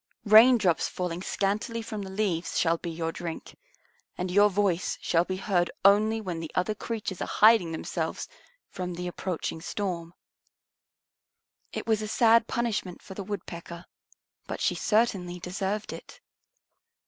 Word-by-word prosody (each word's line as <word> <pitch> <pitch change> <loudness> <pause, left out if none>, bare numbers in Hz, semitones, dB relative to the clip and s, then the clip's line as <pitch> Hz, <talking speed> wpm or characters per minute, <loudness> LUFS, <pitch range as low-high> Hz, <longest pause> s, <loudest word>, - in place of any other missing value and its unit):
Raindrops 215 -4 +6
falling 180 -1 -4
scantily 205 +5 -1
from 215 -2 -5
the 195 - -6
leaves 190 -4 -1
shall 165 -1 +2
be 170 - -5
your 165 0 -3
drink, 165 -1 -7 0.6
and 180 0 -3
your 205 +2 +5
voice 185 -3 0
shall 170 0 +2
be 185 0 -3
heard 185 -3 +1 0.2
only 215 +3 +5
when 170 -6 -4
other 180 +4 +1
creatures 210 -3 -5
are - - -2
hiding 215 -6 +5
themselves 160 - -3 0.4
from 180 -1 -5
the 180 +1 -5
approaching 175 -2 -4
storm." 175 -3 -4 1.6
It - - -5
was 220 -2 +1
a 215 - -3
sad 230 +1 +4
punishment 220 -6 -2
for 190 - -9
the 200 - -6
Woodpecker, 170 -3 -7 0.6
but - - -5
she - - +1
certainly 195 -6 0
deserved 195 +4 -3
it. - - -11
190 Hz, 140 wpm, -27 LUFS, 175-215 Hz, 1.6 s, Raindrops